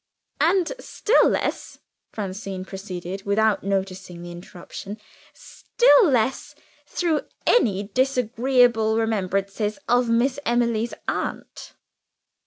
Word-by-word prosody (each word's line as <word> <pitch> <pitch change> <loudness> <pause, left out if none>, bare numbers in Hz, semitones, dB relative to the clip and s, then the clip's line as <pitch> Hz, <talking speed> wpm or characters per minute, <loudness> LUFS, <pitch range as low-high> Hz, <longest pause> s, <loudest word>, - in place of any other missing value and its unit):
"And 355 +1 +2
still 450 - +2
less," - - -2 0.3
Francine 195 -2 -5
proceeded, 190 0 -7
without 215 +1 +1
noticing 190 -2 -3
the 175 - -8
interruption 185 +4 -9 0.3
"still 485 -4 +3
less 250 -1 0 0.3
through 330 -4 0 0.2
any 205 - +3
disagreeable 245 -2 +2
remembrances 205 -1 -1
of 245 0 +2
Miss 245 +4 +1
Emily's 235 -2 0
aunt." - - -5
220 Hz, 90 wpm, -23 LUFS, 195-245 Hz, 0.3 s, still